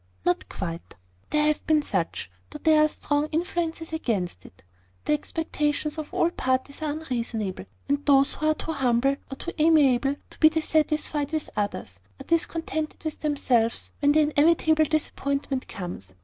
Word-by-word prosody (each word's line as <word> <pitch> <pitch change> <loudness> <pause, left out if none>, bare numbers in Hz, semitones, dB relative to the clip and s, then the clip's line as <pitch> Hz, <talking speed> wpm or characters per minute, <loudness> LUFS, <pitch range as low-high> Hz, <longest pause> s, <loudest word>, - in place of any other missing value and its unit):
"Not 180 - 0
quite. 170 - -6 0.3
There 300 0 +2
have 305 0 +1
been 310 -1 +4
such, - - -2 0.2
though 300 - -8
there 310 0 +4
are - - +5
strong 290 0 -1
influences 325 0 -2
against 195 - -2
it. 95 +2 -20 0.4
The - - +2
expectations 300 0 -1
of 305 - -6
all 340 - +2
parties 260 0 -1
are 310 - -1
unreasonable; 235 -10 -3 0.2
and 285 +1 0
those 275 -1 +5
who 310 - -2
are 310 - +3
too 320 - -4
humble, 270 -1 +2
or - - -4
too 345 - -6
amiable, 285 -4 +4 0.2
to - - -16
be 310 - +7
dissatisfied 310 -2 0
with 315 -1 -2
others, 200 - -3 0.2
are - - -7
discontented 325 -2 -1
with 315 -1 -4
themselves, 250 -6 +1
when 290 0 +4
the 310 - +5
inevitable 310 +1 +3
disappointment 280 -3 -2
comes. 175 - -7
295 Hz, 160 wpm, -26 LUFS, 260-315 Hz, 0.4 s, be